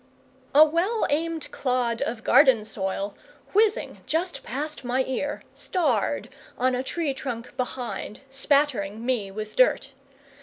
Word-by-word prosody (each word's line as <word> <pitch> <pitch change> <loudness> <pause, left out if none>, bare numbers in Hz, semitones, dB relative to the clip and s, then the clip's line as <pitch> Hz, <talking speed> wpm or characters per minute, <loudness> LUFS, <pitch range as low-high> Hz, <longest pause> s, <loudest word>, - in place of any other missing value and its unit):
A 305 +2 +10
well 355 +9 +1
aimed 325 +1 -1
clod 250 -3 0
of 225 -1 -2
garden 235 -6 +5
soil, 195 -1 -3 0.4
whizzing 425 +1 +2
just 345 +3 -1
past 295 +4 -5
my 255 +2 +1
ear, 265 +3 -3
starred 360 -3 0 0.3
on 255 +1 +2
a 250 - 0
tree 295 +1 -2
trunk 250 -3 -6
behind, 250 -4 -4
spattering 265 -7 +1
me 240 -6 0
with 215 +2 -6
dirt. - - +3
260 Hz, 125 wpm, -26 LUFS, 230-310 Hz, 0.4 s, A